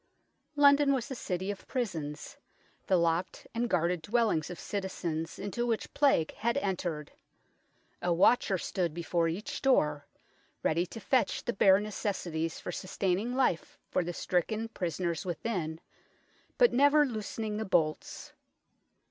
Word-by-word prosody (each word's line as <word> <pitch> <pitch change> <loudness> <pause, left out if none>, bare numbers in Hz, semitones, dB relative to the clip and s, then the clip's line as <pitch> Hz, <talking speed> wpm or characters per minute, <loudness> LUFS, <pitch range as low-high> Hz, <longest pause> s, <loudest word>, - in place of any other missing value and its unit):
London 285 -1 +6
was 260 +2 -4
a - - -1
city 190 -5 -3
of 200 - -9
prisons, 160 - -4 0.5
the 190 - +4
locked 170 +1 0
and 235 +1 -1
guarded 175 -2 +1
dwellings 210 -4 +1
of 180 - -7
citizens 170 -5 -3
into 205 +4 -3
which 230 -2 -2
Plague 275 - +3
had 235 +4 0
entered. 175 - -2 0.9
A 175 - 0
watcher 190 +3 +4
stood 175 -2 -2
before 170 0 0
each 175 +6 -4
door, 150 - +2 0.6
ready 170 +3 +1
to 225 - -8
fetch 255 +3 +1
the 240 - 0
bare 195 0 +5
necessities 185 -6 -3
for - - -5
sustaining 195 +5 -1
life 255 -11 0
for - - +1
the 175 - -3
stricken 215 +6 -1
prisoners 170 -4 -2
within, 175 -3 -3 0.8
but 485 -1 +5
never 285 +3 +5
loosening 215 -3 -4
the 220 - -1
bolts. 165 -6 -1
190 Hz, 135 wpm, -30 LUFS, 170-230 Hz, 0.9 s, London